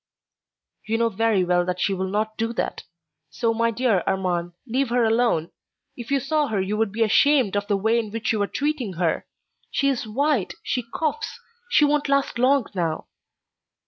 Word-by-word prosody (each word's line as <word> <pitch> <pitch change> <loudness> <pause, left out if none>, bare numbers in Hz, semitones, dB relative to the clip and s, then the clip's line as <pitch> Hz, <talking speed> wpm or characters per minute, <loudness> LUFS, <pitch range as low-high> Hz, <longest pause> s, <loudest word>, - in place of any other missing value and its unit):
"You 225 +1 +1
know 230 0 +2
very 220 -2 +1
well 175 0 +2
that 180 0 -2
she 195 - +1
will 190 0 -2
not 215 +3 -1
do 230 +1 -2
that. - - -3 0.4
So, 230 -2 0
my 230 +1 +1
dear 230 -4 +1
Armand, 175 -2 -1
let 260 +3 0
her 240 +1 +2
alone. 225 -8 +2 0.4
If 240 -2 -8
you 280 0 +2
saw 300 +2 0
her 215 -3 -1
you 190 +2 -1
would 220 -1 0
be 225 +3 +1
ashamed 250 -1 +3
of 205 0 -1
the 200 - +1
way 220 +4 +2
in 220 -2 -3
which 225 +1 -2
you 215 - 0
are 205 - +1
treating 280 -8 -2
her. 170 -1 -1 0.4
She 275 - +1
is 250 -4 -2
white, 270 -1 0
she 250 - -1
coughs—she 455 +3 -1
won't 295 0 +1
last 275 -3 +1
long 260 0 +4
now." 165 -4 -2
225 Hz, 185 wpm, -24 LUFS, 200-270 Hz, 0.4 s, long